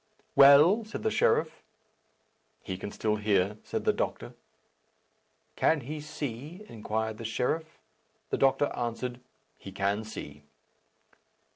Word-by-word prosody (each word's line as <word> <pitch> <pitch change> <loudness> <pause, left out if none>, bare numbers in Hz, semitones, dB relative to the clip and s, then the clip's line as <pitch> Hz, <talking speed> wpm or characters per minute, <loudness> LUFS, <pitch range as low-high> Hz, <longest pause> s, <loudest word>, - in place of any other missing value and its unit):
"Well?" 150 +10 +7
said 220 - -7
the 220 - +1
sheriff. 160 -6 +1 1.0
"He 95 - -4
can 95 - -6
still 105 +1 -1
hear," 105 -1 +1
said - - -4
the - - +4
doctor. - - -3 1.2
"Can 160 -2 +2
he 150 +5 -6
see?" 150 - -6
inquired 110 0 -3
the - - -6
sheriff. 155 +8 -2 0.5
The - - +1
doctor 135 +1 +3
answered, 120 +1 -3 0.4
"He 95 - -9
can 100 +2 -1
see." 75 -9 -9
120 Hz, 120 wpm, -29 LUFS, 105-155 Hz, 1.2 s, Well